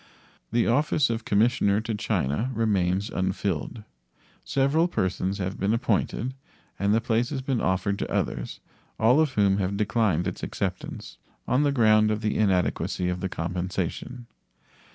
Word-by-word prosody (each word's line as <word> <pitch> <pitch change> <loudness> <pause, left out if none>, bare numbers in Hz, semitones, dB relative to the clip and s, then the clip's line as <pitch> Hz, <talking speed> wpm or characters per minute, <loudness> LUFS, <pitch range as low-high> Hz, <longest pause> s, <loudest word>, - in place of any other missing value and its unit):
The 115 +1 +2
office 140 +1 +2
of 115 0 -3
commissioner 105 -1 +2
to 115 0 -3
China 105 - -1
remains 100 -2 +1
unfilled. 95 +1 -2 0.6
Several 140 +5 +2
persons 95 - -1
have 95 0 -4
been 100 +3 +2
appointed, 115 +2 -1 0.5
and 100 +1 +2
the 110 - +4
place 115 0 0
has 135 -3 -4
been 130 -3 -1
offered 95 +2 0
to - - -4
others, - - -2 0.4
all 120 +6 +5
of 155 -4 +2
whom 100 -4 +3
have 100 0 -1
declined 105 -4 +1
its 90 - -4
acceptance - - -5 0.3
on 130 - +2
the 145 -1 +2
ground 110 -4 +4
of 105 0 -1
the 105 -1 -1
inadequacy 90 -2 +1
of 90 0 -2
the 95 - -3
compensation. 90 +8 -4
105 Hz, 150 wpm, -26 LUFS, 95-120 Hz, 0.6 s, all